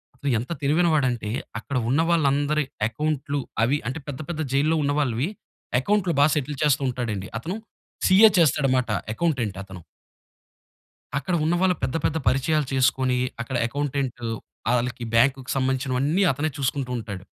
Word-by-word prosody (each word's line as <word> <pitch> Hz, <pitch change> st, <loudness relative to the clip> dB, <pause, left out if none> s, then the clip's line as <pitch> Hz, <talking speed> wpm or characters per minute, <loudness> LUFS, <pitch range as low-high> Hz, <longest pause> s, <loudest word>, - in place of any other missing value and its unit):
అతను 140 Hz, +2 st, -3 dB
ఎంత 125 Hz, -, -6 dB
తెలివైనవాడంటే 145 Hz, -7 st, +2 dB, 0.3 s
అక్కడ 130 Hz, +4 st, -4 dB
ఉన్న 145 Hz, +5 st, +3 dB
వాళ్ళందరి 150 Hz, -2 st, +2 dB, 0.2 s
అకౌంట్లు 145 Hz, +2 st, -2 dB, 0.2 s
అవి 130 Hz, +5 st, +2 dB
అంటే 135 Hz, +6 st, -3 dB
పెద్ద 140 Hz, -1 st, -5 dB
పెద్ద 160 Hz, -2 st, -3 dB
జైల్లో 150 Hz, +4 st, +3 dB
ఉన్న 145 Hz, -, +1 dB
వాళ్ళవి 135 Hz, -, 0 dB, 0.5 s
అకౌంట్లు 195 Hz, +2 st, +1 dB
బా 145 Hz, -, +7 dB
సెటిల్ 145 Hz, -1 st, -2 dB
చేస్తూ 145 Hz, -1 st, +3 dB
ఉంటాడండి. 115 Hz, -6 st, -3 dB
అతను 175 Hz, -, -4 dB, 0.5 s
సీఏ 210 Hz, +4 st, +8 dB
చేస్తాడు 150 Hz, -4 st, +3 dB
మాట. 125 Hz, -2 st, -1 dB, 0.2 s
అకౌంటెంట్ 125 Hz, -, -1 dB
అతను. 95 Hz, -2 st, -11 dB, 1.4 s
అక్కడ 140 Hz, +6 st, -2 dB
ఉన్న 165 Hz, +2 st, +2 dB
వాళ్ళు 185 Hz, -1 st, +3 dB
పెద్ద 130 Hz, -, -1 dB
పెద్ద 160 Hz, -, +1 dB
పరిచయాలు 140 Hz, +3 st, +2 dB
చేసుకొని 130 Hz, -1 st, +2 dB, 0.2 s
అక్కడ 130 Hz, +3 st, -5 dB
అకౌంటెంటు 135 Hz, -3 st, -3 dB, 0.4 s
ఆళ్ళకి 120 Hz, 0 st, -1 dB
బ్యాంక్‌కు 130 Hz, +2 st, +2 dB
సంబంధించినవన్నీ 135 Hz, +5 st, +1 dB
అతనే 145 Hz, +4 st, -1 dB
చూసుకుంటూ 135 Hz, -1 st, -1 dB
ఉంటాడు. 100 Hz, -4 st, -6 dB
140 Hz, 140 wpm, -24 LUFS, 125-155 Hz, 1.4 s, సీఏ